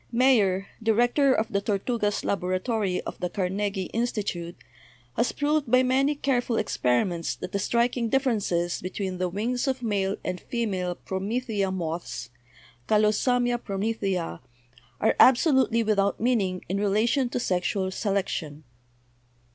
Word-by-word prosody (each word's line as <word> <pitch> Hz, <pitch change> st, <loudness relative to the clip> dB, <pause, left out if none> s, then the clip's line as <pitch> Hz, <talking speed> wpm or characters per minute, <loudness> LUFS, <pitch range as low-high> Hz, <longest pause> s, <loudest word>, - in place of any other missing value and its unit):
Mayer, 225 Hz, -7 st, +3 dB, 0.2 s
director 240 Hz, +5 st, +3 dB
of 220 Hz, -3 st, +1 dB
the 200 Hz, -, +1 dB
Tortugas 210 Hz, +1 st, -1 dB
laboratory 185 Hz, +1 st, -1 dB
of -, -, -8 dB
the 180 Hz, -, -2 dB
Carnegie 195 Hz, +1 st, -2 dB
Institute, 205 Hz, -7 st, -2 dB, 0.6 s
has 235 Hz, -, +1 dB
proved 295 Hz, -2 st, 0 dB
by 255 Hz, +2 st, +5 dB
many 270 Hz, +3 st, +2 dB
careful 250 Hz, -4 st, 0 dB
experi 125 Hz, -, +1 dB
ments 170 Hz, -2 st, -3 dB
that -, -, -7 dB
the 200 Hz, -, -1 dB
striking 235 Hz, +2 st, +1 dB
differences 210 Hz, -, 0 dB
between 185 Hz, 0 st, -4 dB
the 180 Hz, -1 st, 0 dB
wings 235 Hz, +8 st, -2 dB
of 260 Hz, -2 st, -1 dB
male 200 Hz, -3 st, 0 dB
and 185 Hz, -1 st, -3 dB
female 190 Hz, -7 st, -2 dB
promethea 205 Hz, +2 st, -2 dB
moths, 165 Hz, -8 st, -4 dB, 0.6 s
'Callosamia 240 Hz, +3 st, +2 dB
promethea/ 195 Hz, -, -2 dB, 0.6 s
are 220 Hz, -, +2 dB
absolutely 260 Hz, -3 st, +5 dB
without 200 Hz, -2 st, +1 dB
meaning 205 Hz, -6 st, 0 dB
in 195 Hz, +2 st, -1 dB
relation 220 Hz, +6 st, +2 dB
to 245 Hz, -, -2 dB
sexual 190 Hz, -2 st, -1 dB
se 205 Hz, +2 st, -3 dB
lection. 160 Hz, -6 st, -2 dB
210 Hz, 130 wpm, -26 LUFS, 185-245 Hz, 0.6 s, by